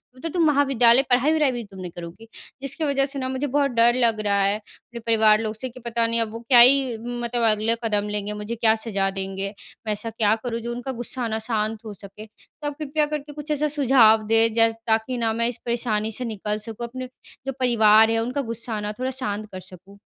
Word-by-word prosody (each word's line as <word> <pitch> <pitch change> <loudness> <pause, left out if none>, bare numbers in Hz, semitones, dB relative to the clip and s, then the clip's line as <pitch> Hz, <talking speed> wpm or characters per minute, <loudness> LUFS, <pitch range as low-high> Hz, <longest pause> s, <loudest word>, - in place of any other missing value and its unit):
तब 255 - -16
तो 330 - -2
तुम 335 0 +1
महाविद्यालय 270 -4 +4
पढ़ाई-वढ़ाई 285 +3 +3
भी 240 -2 -5
तुम 195 -2 -13
नहीं 180 -2 -6
करोगी। 175 +6 -9 0.3
जिसकी 275 +4 -4
वजह 275 -1 +1
से 275 0 -5
न 260 0 -3
मुझे 265 +2 -2
बहुत 280 0 +1
डर 235 0 +4
लग 230 -3 +2
रहा 200 0 +2
है, 200 +1 +2
अपने 235 +2 -13
परिवार 220 -2 +4
लोग 215 -1 -3
से, 255 +3 -6
कि 255 +2 -13
पता 235 -1 -1
नहीं 230 0 0
अब 220 -1 -3
वो 230 - -7
क्या 245 -2 +7
ही 255 -1 +5
मतलब 240 0 -3
अगला 215 +2 +1
कदम 210 -2 -1
लेंगे 210 0 -3
मुझे 210 +3 -5
क्या 220 -1 +3
सज़ा 200 -4 -2
देंगे? 195 +1 -4 0.3
मैं 210 - +1
ऐसा 210 +2 -5
क्या 220 -1 +1
करूँ 235 -1 -3
जो 235 +1 -5
उनका 245 +2 -5
गुस्सा 240 0 -4
न 220 0 -2
शांत 215 0 -1
हो 210 - -6
सके? 200 +2 -12
तो 290 +7 -11
आप 290 0 -5
कृपया 300 0 0
करके 295 0 -5
कुछ 300 +1 -6
ऐसा 300 +1 +1
सुझाव 265 -6 +5
दें, 225 0 +3
जै 225 0 +4 0.2
ताकि 225 +3 +1
न 225 -1 0
मैं 230 0 +1
इस 245 0 -4
परेशानी 225 -2 -1
से 250 +3 -6
निकल 210 -1 -3
सकूँ, 225 +2 -7
अपने 255 +1 -7 0.4
जो - - 0
परिवार 220 -3 +5
है 225 - +1
उनका 255 +4 -2
गुस्सा 230 -2 -5
न 210 0 -3
थोड़ा 260 +1 -1
शांत 215 -5 -4
कर 185 - -7
सकूँ। 185 +2 -14
230 Hz, 230 wpm, -23 LUFS, 215-255 Hz, 0.4 s, क्या